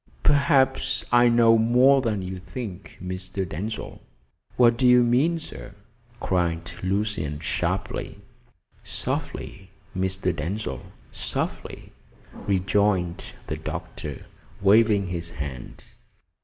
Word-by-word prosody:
Perhaps 140 Hz, -2 st, +3 dB
I 120 Hz, 0 st, +6 dB
know 115 Hz, -1 st, +5 dB
more 125 Hz, +4 st, +5 dB
than 110 Hz, -6 st, -1 dB
you 95 Hz, 0 st, -5 dB
think, 95 Hz, +1 st, -8 dB
Mr. 95 Hz, +1 st, -4 dB
Denzil." 105 Hz, +8 st, -5 dB, 0.6 s
"What 120 Hz, -1 st, +6 dB
do 125 Hz, +2 st, +3 dB
you 125 Hz, 0 st, +7 dB
mean, 135 Hz, +8 st, +3 dB
sir?" 105 Hz, -9 st, -9 dB, 0.4 s
cried 85 Hz, -2 st, -1 dB
Lucian 95 Hz, -6 st, -1 dB
sharply. -, -, -2 dB, 0.7 s
"Softly, 95 Hz, -1 st, -5 dB, 0.3 s
Mr. 95 Hz, -1 st, 0 dB
Denzil, 90 Hz, +8 st, -3 dB, 0.3 s
softly," -, -, -4 dB, 0.4 s
rejoined 95 Hz, -2 st, 0 dB
the -, -, -4 dB
doctor, -, -, -6 dB, 0.3 s
waving 105 Hz, 0 st, +4 dB
his 85 Hz, -1 st, -3 dB
hand. 70 Hz, -6 st, -8 dB
100 Hz, 100 wpm, -25 LUFS, 90-120 Hz, 0.7 s, you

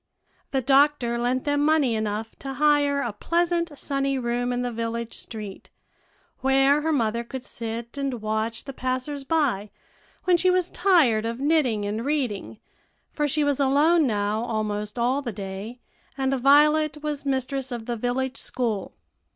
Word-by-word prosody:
The 265 Hz, -2 st, -1 dB
doctor 270 Hz, -3 st, +3 dB
lent 250 Hz, +2 st, 0 dB
them 290 Hz, 0 st, +1 dB
money 300 Hz, -5 st, +3 dB
enough 215 Hz, 0 st, -3 dB
to 270 Hz, -1 st, -6 dB
hire 290 Hz, -1 st, +3 dB
a 235 Hz, -5 st, -3 dB
pleasant, 340 Hz, +4 st, 0 dB
sunny 275 Hz, -1 st, -1 dB
room 245 Hz, 0 st, -1 dB
in 245 Hz, 0 st, -1 dB
the 245 Hz, -, -2 dB
village 230 Hz, 0 st, -4 dB
street, 210 Hz, -4 st, -8 dB, 0.7 s
where 270 Hz, +2 st, +3 dB
her 320 Hz, +1 st, 0 dB
mother 235 Hz, -4 st, 0 dB
could 255 Hz, +2 st, -7 dB
sit 230 Hz, +1 st, -6 dB
and 270 Hz, -3 st, -2 dB
watch 220 Hz, +1 st, -2 dB
the 275 Hz, -, -7 dB
passers 255 Hz, +3 st, -3 dB
by 270 Hz, -9 st, 0 dB, 0.5 s
when 360 Hz, -1 st, +4 dB
she 370 Hz, +2 st, +3 dB
was 365 Hz, -1 st, +1 dB
tired 305 Hz, -, +3 dB
of 230 Hz, +1 st, -4 dB
knitting 275 Hz, -8 st, +2 dB
and 215 Hz, +3 st, -2 dB
reading, 260 Hz, -8 st, -2 dB, 0.6 s
for 295 Hz, -1 st, 0 dB
she 300 Hz, +1 st, +1 dB
was 285 Hz, -1 st, +1 dB
alone 290 Hz, +4 st, +4 dB
now 210 Hz, 0 st, 0 dB
almost 210 Hz, -2 st, -3 dB
all 250 Hz, +4 st, +1 dB
the 245 Hz, -4 st, -4 dB
day, 200 Hz, +4 st, -7 dB, 0.4 s
and 265 Hz, 0 st, 0 dB
Violet 300 Hz, +3 st, +4 dB
was 295 Hz, -2 st, -3 dB
mistress 270 Hz, -1 st, -2 dB
of 235 Hz, -2 st, -5 dB
the 240 Hz, -, -2 dB
village 250 Hz, +3 st, -2 dB
school. 230 Hz, -6 st, -3 dB
260 Hz, 160 wpm, -25 LUFS, 230-290 Hz, 0.7 s, when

